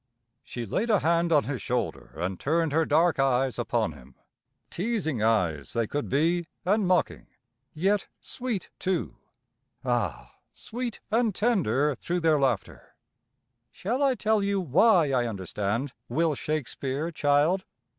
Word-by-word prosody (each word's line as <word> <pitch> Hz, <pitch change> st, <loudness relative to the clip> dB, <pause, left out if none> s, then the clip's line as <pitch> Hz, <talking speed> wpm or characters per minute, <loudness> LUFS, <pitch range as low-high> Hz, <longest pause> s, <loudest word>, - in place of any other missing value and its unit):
She 120 Hz, -1 st, -6 dB
laid 220 Hz, -, -1 dB
a 215 Hz, -, +5 dB
hand 170 Hz, +1 st, +2 dB
on 150 Hz, -3 st, +5 dB
his 135 Hz, -3 st, -4 dB
shoulder 125 Hz, 0 st, -3 dB
and 90 Hz, +2 st, -3 dB
turned 165 Hz, +1 st, +1 dB
her 160 Hz, +2 st, +2 dB
dark 160 Hz, +1 st, +3 dB
eyes 130 Hz, -2 st, +2 dB
upon -, -, 0 dB
him. 60 Hz, -, -15 dB, 0.6 s
Teasing 180 Hz, -, -1 dB
eyes 90 Hz, -11 st, +1 dB
they 115 Hz, -1 st, +1 dB
could 145 Hz, +7 st, -3 dB
be 165 Hz, +5 st, +1 dB, 0.2 s
and 205 Hz, +1 st, +2 dB
mocking, 180 Hz, 0 st, +1 dB, 0.5 s
yet 195 Hz, +5 st, +1 dB
sweet, 240 Hz, -6 st, -5 dB
too. 185 Hz, -1 st, -2 dB, 0.7 s
Ah, -, -, -1 dB, 0.2 s
sweet 240 Hz, 0 st, -5 dB
and 225 Hz, -3 st, +2 dB
tender 150 Hz, -, +2 dB
through 175 Hz, +7 st, -3 dB
their 160 Hz, -2 st, +3 dB
laughter! 125 Hz, -10 st, -2 dB, 0.8 s
"Shall 240 Hz, +8 st, -2 dB
I 275 Hz, -2 st, +3 dB
tell 220 Hz, -2 st, +1 dB
you 200 Hz, 0 st, +1 dB
why 175 Hz, -, +4 dB
I 125 Hz, -2 st, +1 dB
understand, 105 Hz, -, -3 dB, 0.2 s
Will 165 Hz, 0 st, +1 dB
Shakespeare, 145 Hz, +1 st, -3 dB
child?" 150 Hz, +5 st, +2 dB
160 Hz, 135 wpm, -27 LUFS, 130-190 Hz, 0.8 s, a